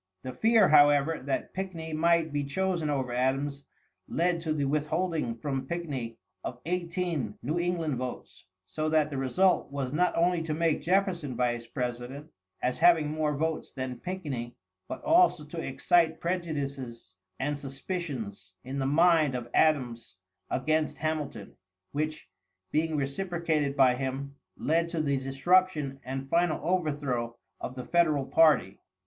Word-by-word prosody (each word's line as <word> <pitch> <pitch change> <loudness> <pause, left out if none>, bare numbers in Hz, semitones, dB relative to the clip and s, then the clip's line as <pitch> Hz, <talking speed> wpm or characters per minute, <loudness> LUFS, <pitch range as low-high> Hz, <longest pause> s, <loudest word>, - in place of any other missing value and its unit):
The 130 - -5
fear, 225 -3 +5
however, 145 +1 +5
that 140 - -2
Pickney 170 -4 -5
might 165 0 +2
be 145 0 0
chosen 175 +2 -1
over 135 -4 -1
Adams 135 +3 -1 0.4
led 170 0 +1
to 160 -2 -2
the 150 -2 0
withholding 150 -2 0
from 135 +2 -3
Pickney 135 -9 -4 0.3
of 125 - -5
eighteen 170 - -2
New 155 +7 -1
England 170 -5 -1
votes, 110 -6 -6 0.2
so 155 +12 -2
that 155 -1 +2
the 135 - -2
result 180 +6 +2
was 135 -2 -3
not 180 +3 +2
only 175 0 +3
to 160 -1 -2
make 165 -1 +1
Jefferson 175 - +1
Vice 120 -1 -1
President, 125 +4 -5 0.3
as 125 - 0
having 165 -3 +5
more 155 -2 0
votes 160 +1 -1
than 130 -2 -4
Pickney, 145 -11 -5 0.3
but - - -6
also 330 - +4
to 165 +3 -7
excite 160 +4 +2
prejudices 140 - -4 0.3
and 145 +2 -1
suspicions 135 - -5
in 135 +2 -4
the 135 - 0
mind 155 -2 +4
of 120 -1 -5
Adams 125 -10 +1 0.3
against 155 +3 0
Hamilton, 150 -9 -3 0.4
which, 155 +1 -3 0.4
being 155 0 +1
reciprocated 155 0 -1
by 130 -2 +6
him, 135 +2 -4 0.2
led 165 +2 +1
to 165 -1 -3
the 140 -3 +1
disruption 140 +1 +2
and 135 +1 -5
final 170 +2 +2
overthrow 145 -9 -1 0.2
of 125 - -6
the 125 -1 -6
Federal 155 -5 +2
party. 140 -8 +4
150 Hz, 140 wpm, -29 LUFS, 130-170 Hz, 0.4 s, by